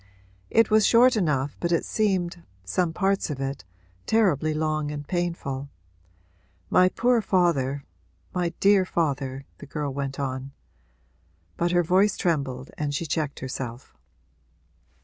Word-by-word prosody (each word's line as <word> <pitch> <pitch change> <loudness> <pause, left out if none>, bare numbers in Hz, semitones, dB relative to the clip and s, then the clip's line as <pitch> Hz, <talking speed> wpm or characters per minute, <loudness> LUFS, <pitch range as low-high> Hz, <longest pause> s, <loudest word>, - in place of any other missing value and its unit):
'It 225 -1 +3
was 215 0 +5
short 245 +3 +6
enough 150 -8 0
but 170 - -1
it 170 - +1
seemed 185 -5 0 0.2
some 165 - 0
parts 195 +3 0
of 145 -3 -4
it 135 -5 -4 0.4
terribly 175 -9 +2
long 155 -1 -1
and 145 -1 -6
painful. 165 -6 -3 1.0
My 185 0 +5
poor 240 +3 +2
father 145 -9 +1 0.5
my 180 -1 0
dear 200 -1 +5
father,' 140 -6 -2
the - - -10
girl 145 -1 -3
went 135 0 -4
on. 135 0 -4 1.0
But 175 0 0
her 175 0 +3
voice 190 +5 +3
trembled 140 -6 -1
and 145 -1 -1
she 165 - -2
checked 150 -2 -2
herself. 130 -1 -6
155 Hz, 130 wpm, -25 LUFS, 140-185 Hz, 1.0 s, short